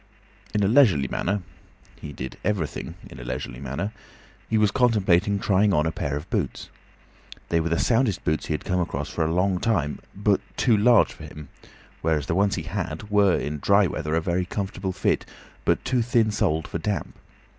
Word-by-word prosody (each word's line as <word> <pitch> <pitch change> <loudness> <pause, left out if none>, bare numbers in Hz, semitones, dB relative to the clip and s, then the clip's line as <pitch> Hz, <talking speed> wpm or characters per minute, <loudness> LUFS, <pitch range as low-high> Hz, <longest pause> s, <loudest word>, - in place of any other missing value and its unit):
In 105 - +2
a - - +3
leisurely 105 - +5
manner—he 90 -4 -6
did 65 -2 -6
everything 95 -8 -2
in 60 - -12
a - - -7
leisurely 65 +1 -5
manner—he 95 - -6
was 105 -2 +3
contemplating 100 -6 +3
trying 100 0 +2
on 75 - +2
a 80 - 0
pair 70 -2 -2
of 75 - -7
boots. - - -2 0.8
They 85 - +2
were 80 +1 -1
the 85 - +1
soundest 115 -3 +1
boots 80 0 -1
he 80 - 0
had - - -7
come 90 -2 0
across 75 -4 -2
for 80 - -1
a 80 - 0
long 90 +1 +1
time, 80 -11 0 0.2
but 100 0 +2 0.2
too 120 -4 +4
large 115 +2 +5
for 80 - -11
him; 75 -2 -10 0.5
whereas 80 -3 +1
the - - -1
ones 100 +3 +2
he 80 - -4
had 90 +2 -5
were, 100 -3 +4
in 75 0 -3
dry 100 +6 +4
weather, 75 -2 -2
a 80 - +2
very 90 +2 0
comfortable 95 0 -3
fit, - - 0 0.4
but - - +1
too 125 -2 +1
thin 115 -2 +2
soled 80 -5 0
for 85 - -4
damp. 100 +4 -2
90 Hz, 190 wpm, -25 LUFS, 80-105 Hz, 0.8 s, leisurely